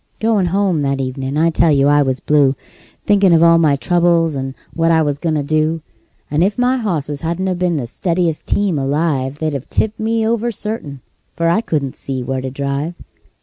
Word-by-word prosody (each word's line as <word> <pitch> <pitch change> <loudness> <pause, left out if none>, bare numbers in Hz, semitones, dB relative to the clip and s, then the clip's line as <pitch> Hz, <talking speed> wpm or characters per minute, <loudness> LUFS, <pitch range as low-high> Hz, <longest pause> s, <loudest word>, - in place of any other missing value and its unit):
Goin' 220 -5 +1
home 190 -3 +1
that 140 -1 -1
evenin' 135 +1 -3
I 165 +2 +3
tell 165 0 +3
you 140 -1 +3
I 145 0 +4
was 130 -2 0
blue, 145 -3 +2 0.5
Thinkin' 200 -3 +4
of 165 0 +5
all 170 0 +6
my 155 -4 +3
troubles, 170 0 +2
and 135 0 -4 0.2
what 165 0 +1
I 160 -1 +4
was 145 -1 -2
goin' 165 -3 -1
to 145 - 0
do; 155 +2 0 0.5
And 150 +3 +2
if 200 +2 0
my 250 +1 +2
hosses 155 - -3
hadn't 180 +3 -1
been 180 -2 +1
the 135 -5 -2
steadiest 170 - -2
team 195 -7 0
alive, 140 -1 -1
They'd 155 -1 -2
've 140 -2 -5
tipped 220 0 -1
me 225 0 0
over, 230 +1 0
certain, 205 - -5 0.3
for 165 0 0
I 205 +6 +2
couldn't 145 - -2
see 130 -2 -4
where 130 +1 -3
to 130 - -4
drive. 140 +5 -3
160 Hz, 200 wpm, -17 LUFS, 140-180 Hz, 0.5 s, all